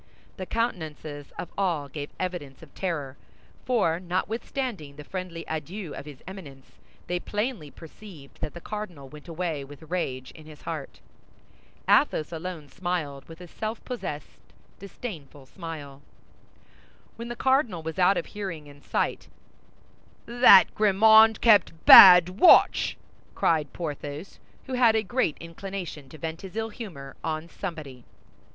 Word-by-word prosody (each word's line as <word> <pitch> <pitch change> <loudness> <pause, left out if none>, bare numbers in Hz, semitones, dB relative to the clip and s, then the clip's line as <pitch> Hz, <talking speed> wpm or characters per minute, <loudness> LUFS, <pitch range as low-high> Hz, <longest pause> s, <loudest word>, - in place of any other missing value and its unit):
The 185 -2 -6
countenances 155 - -4
of 175 - -6
all 170 -7 -1
gave 145 +1 -7
evidence 170 -7 -5
of 150 - -16
terror, 150 -8 -4 0.5
for 210 -10 +1
notwithstanding 185 - -4
the 150 - -10
friendly 180 0 -6
adieu 165 +2 -5
of - - -8
his 145 -3 -12
Eminence, 150 -9 -12 0.3
they 180 0 -2
plainly 210 - -3
perceived 160 -2 -14
that 150 - -5
the 175 - -8
cardinal 180 -11 -7
went 150 +2 -13
away 165 -3 -3
with 145 +3 -14
rage 130 -8 -3
in 155 -1 -15
his 150 -1 -14
heart. 155 -4 -7 0.9
Athos 155 +2 +3
alone 165 -2 -6
smiled, 170 -6 -4
with 165 +2 -12
a 180 - -10
self 215 +5 -6
possessed, 155 - -6 0.4
disdainful 165 - -9
smile. 145 -3 -9 1.1
When 235 +1 -7
the 240 - -5
cardinal 255 - +1
was 160 +3 -5
out 185 +2 +4
of - - -2
hearing 185 -8 -7
and 145 -1 -16
sight, - - -2 1.0
"That 240 -4 +6
Grimaud 220 +1 +5
kept 200 -8 +3
bad 180 0 +10
watch!" 360 - +5 0.4
cried 155 -4 +1
Porthos, 150 +1 -7 0.3
who 265 - -7
had 240 -3 +4
a 220 - +1
great 225 - -1
inclination 170 -4 -7
to 155 - -12
vent 160 +1 -6
his 190 0 -10
ill 225 0 -2
humor 165 - -9
on 160 0 -3
somebody. 155 -9 -8
170 Hz, 140 wpm, -26 LUFS, 150-200 Hz, 1.1 s, bad